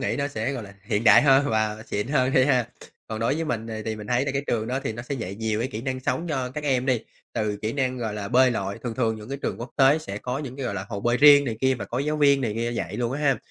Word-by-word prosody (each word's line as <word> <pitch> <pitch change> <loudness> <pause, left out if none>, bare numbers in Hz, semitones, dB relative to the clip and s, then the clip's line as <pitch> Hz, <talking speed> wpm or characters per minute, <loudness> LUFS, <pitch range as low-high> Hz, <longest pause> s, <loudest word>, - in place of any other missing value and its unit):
nghĩ - - -1
nó 140 0 0
sẽ, 125 0 -2
gọi 125 -4 -4
là, 100 -1 -12
hiện 105 +1 -1
đại 105 +4 +8
hơn 140 0 +5
hoặc - - -1 0.3
là 110 - -10
xịn 105 +2 -2
hơn 135 -2 +2
đi 130 - +5
ha. 125 -4 +2 0.4
Còn 110 -1 -4
đối 115 +5 +1
với 165 +1 -2
mình 115 -6 -3 0.2
thì 110 -1 -3
mình 105 -1 -8
thấy 125 +3 +1
là 135 - -2
cái 140 0 -1
trường 110 -1 -1
đó 130 +3 -2
thì - - -2
nó 120 +2 -7
sẽ 140 - -4
dạy 105 -7 -5
nhiều 110 0 -2
cái 125 - -1
kỹ 110 - -5
năng 130 -1 -3
sống 165 +6 -2
cho 130 -4 -2
các 150 +3 -6
em 130 -2 +1
đi, 125 -4 +2 0.3
từ 105 -3 -1
kỹ 110 +2 -1
năng, 130 -2 -1
gọi 110 -3 -3
là, 100 -1 -4
bơi 130 +1 +5
lội, 100 -3 -3
thường 120 -2 -4
thường 115 -3 0
những 105 +2 -10
cái 140 - -4
trường - - -2
quốc 120 - -6
tế 140 +3 +5
sẽ 100 -9 -6
có 125 +4 -3
những 135 -3 -6
cái, 135 - -4
gọi 100 - -3
là, 95 0 -4
hồ 100 -4 -4
bơi 120 +3 +1
riêng 145 0 +8
này 115 -4 -3
kia 130 0 +3
và 120 - -5
có 120 - -4
giáo 150 +2 -1
viên 140 -2 +4
này 110 -4 -1
kia 115 +1 -1
dạy - - -4
luôn 120 0 -1
á 145 - -3
ha. 135 -3 +3
125 Hz, 325 wpm, -25 LUFS, 110-135 Hz, 0.4 s, đại